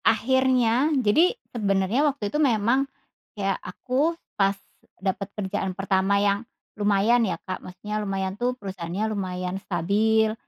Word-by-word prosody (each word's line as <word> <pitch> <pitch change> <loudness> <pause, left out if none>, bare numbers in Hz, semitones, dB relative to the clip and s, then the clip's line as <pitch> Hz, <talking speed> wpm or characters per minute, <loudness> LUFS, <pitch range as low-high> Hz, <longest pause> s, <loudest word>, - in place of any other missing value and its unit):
Akhirnya, 255 +2 +3
jadi 310 - +3 0.2
sebenarnya 200 +1 +1
waktu 225 -8 -4
itu 300 - +1
memang, 255 +1 +2 0.5
ya 195 -1 +1
aku 285 +7 -1 0.2
pas 195 0 +2 0.4
dapat 195 +1 -2
kerjaan 190 -2 -2
pertama 195 0 +2
yang 200 0 +2 0.3
lumayan 210 +3 +3
ya, 190 -7 0
Kak. 185 - -4
Maksudnya 210 +4 -5
lumayan 195 -2 -2
tuh 245 +5 -1
perusahaannya 190 -1 -4
lumayan 185 -1 -3
stabil, 215 +5 +2
205 Hz, 125 wpm, -25 LUFS, 195-240 Hz, 0.5 s, Akhirnya